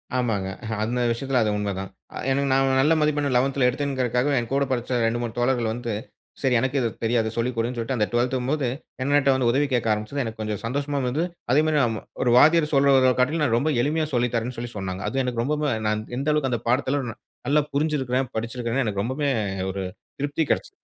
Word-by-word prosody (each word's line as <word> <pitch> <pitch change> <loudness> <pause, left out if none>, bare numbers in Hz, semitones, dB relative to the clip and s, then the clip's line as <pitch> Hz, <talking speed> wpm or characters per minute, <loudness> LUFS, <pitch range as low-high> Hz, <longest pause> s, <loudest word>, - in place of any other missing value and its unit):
ஆமாங்க. 110 -7 0 0.3
அந்த 120 +3 -1
விஷயத்துல 130 +2 0
அது 110 - +1
உண்மதான். 100 -2 -3 0.3
அ - - -4
எனக்கு 140 +1 +1
நான் 135 0 +3
நல்ல 150 +4 +4
மதிப்பெண் 150 -1 +1
11த்துல 135 0 +2
எடுத்தேங்கிறதற்காகவே, 130 0 0
எங்கூட 135 +4 0
படிச்ச 125 0 0
2, 115 +1 0
3 120 -2 -3
தோழர்கள் 120 -2 +1
வந்து. 120 -1 -4 0.5
சரி 130 -3 +2
எனக்கு 130 +3 0
இது 120 -3 +1
தெரியாது 115 -1 +1
சொல்லிக்கொடுன்னு 120 0 -1
சொல்ட்டு 115 +3 -2
அந்த 105 -2 +1
12த் 120 +2 +1
ங்கும்போது, 135 +2 -1 0.4
என்னட்ட 140 0 +3
வந்து 130 -2 +2
உதவி 145 +4 +2
கேக்க 120 -2 +1
ஆரம்பிச்சது 110 +7 -3
எனக்கு 115 -1 -6
கொஞ்சம் 105 -2 -3
சந்தோஷமாவும் 140 +2 -1
இருந்தது. 150 +7 0 0.3
அதே 145 +4 +5
மாதிரி 155 -2 +3
ம - - -7 0.2
ஒரு 120 - +3
வாத்தியார் 155 +2 +5
சொல்றத 135 -2 +5
காட்டிலும் 150 +5 +2
நான் 115 -4 +2
ரொம்ப 155 +6 +1
எளிமையா 155 +3 +1
சொல்லித்தரேன்னு 120 0 0
சொல்லி 120 0 -5
சொன்னாங்க. 95 -1 -4
அது 135 - 0
எனக்கு 125 -2 -1
ரொம்பவும் 150 +2 0 0.2
நான் 110 0 -1
எந்த 140 +3 -1
அளவுக்கு 145 -4 0
அந்த 120 -3 -1
பாடத்துல 130 +3 +1
ந - - -12 0.3
நல்லா 150 +2 +4
புரிஞ்சுருக்கிறேன், 135 -4 0
படிச்சுருக்கிறேன்னு 115 +3 -1
எனக்கு 100 -2 -1
ரொம்பவுமே 135 +5 -1 0.4
ஒரு 95 +1 -4 0.4
திருப்தி 145 +3 0
கிடைச்சது. - - 0
125 Hz, 190 wpm, -24 LUFS, 115-140 Hz, 0.5 s, அதே